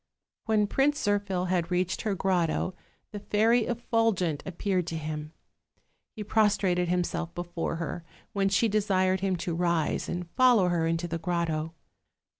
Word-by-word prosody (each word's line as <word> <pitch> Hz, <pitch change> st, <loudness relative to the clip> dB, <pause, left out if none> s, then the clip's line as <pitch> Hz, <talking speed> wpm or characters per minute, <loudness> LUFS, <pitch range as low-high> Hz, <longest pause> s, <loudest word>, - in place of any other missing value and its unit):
When 215 Hz, -2 st, +2 dB
Prince 280 Hz, +7 st, +1 dB
Zirphil 200 Hz, -3 st, 0 dB
had 175 Hz, -2 st, 0 dB
reached 180 Hz, 0 st, 0 dB
her 210 Hz, -3 st, -1 dB
grotto 185 Hz, -1 st, 0 dB, 0.4 s
the 205 Hz, -, -6 dB
Fairy 220 Hz, +3 st, +2 dB
Effulgent 225 Hz, -9 st, 0 dB
appeared 185 Hz, -1 st, -1 dB
to 165 Hz, -, -3 dB
him; 155 Hz, -1 st, -5 dB, 0.8 s
he 215 Hz, -, -5 dB
pros 210 Hz, 0 st, +3 dB
trated 180 Hz, -3 st, +1 dB
himself 175 Hz, -1 st, -1 dB
before 175 Hz, -1 st, -3 dB
her, 165 Hz, +1 st, -4 dB, 0.3 s
when 195 Hz, -1 st, +1 dB
she 215 Hz, +4 st, +3 dB
desired 190 Hz, -3 st, +1 dB
him 190 Hz, 0 st, 0 dB
to 170 Hz, 0 st, -3 dB
rise 170 Hz, -2 st, 0 dB
and 175 Hz, 0 st, -4 dB
follow 245 Hz, -8 st, +4 dB
her 165 Hz, -2 st, +1 dB
into 165 Hz, +1 st, -1 dB
the 165 Hz, 0 st, -3 dB
grotto. 165 Hz, -2 st, -2 dB
180 Hz, 150 wpm, -28 LUFS, 170-205 Hz, 0.8 s, follow